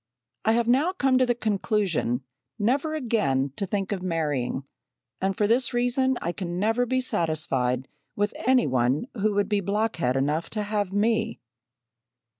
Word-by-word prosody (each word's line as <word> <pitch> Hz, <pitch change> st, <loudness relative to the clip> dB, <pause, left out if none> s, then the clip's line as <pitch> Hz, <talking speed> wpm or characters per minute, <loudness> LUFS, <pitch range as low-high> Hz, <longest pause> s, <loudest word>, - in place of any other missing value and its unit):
I 220 Hz, -, +4 dB
have 235 Hz, 0 st, +1 dB
now 280 Hz, +9 st, +3 dB
come 270 Hz, -7 st, +2 dB
to 255 Hz, -, +3 dB
the 240 Hz, -, +2 dB
conclusion 200 Hz, -, 0 dB, 0.3 s
never 270 Hz, +8 st, +1 dB
again 145 Hz, -, 0 dB
to 195 Hz, -, -3 dB
think 195 Hz, +1 st, -2 dB
of 195 Hz, -3 st, -2 dB
marrying, 150 Hz, -7 st, -1 dB, 0.6 s
and 190 Hz, 0 st, 0 dB
for 210 Hz, -, +2 dB
this 240 Hz, +3 st, +1 dB
reason 245 Hz, +2 st, +2 dB
I 170 Hz, -, 0 dB
can 175 Hz, -1 st, -4 dB
never 225 Hz, +5 st, +1 dB
be 260 Hz, +2 st, +1 dB
satisfied 135 Hz, -, 0 dB, 0.3 s
with 205 Hz, 0 st, 0 dB
any 255 Hz, -1 st, +5 dB
one 130 Hz, -, +1 dB
who 210 Hz, -2 st, 0 dB
would 205 Hz, -1 st, +2 dB
be 205 Hz, -1 st, +1 dB
blockhead 200 Hz, -, 0 dB
enough 150 Hz, +5 st, 0 dB
to 210 Hz, -, 0 dB
have 205 Hz, -2 st, -1 dB
me!" 220 Hz, +2 st, +1 dB
205 Hz, 160 wpm, -26 LUFS, 165-235 Hz, 0.6 s, any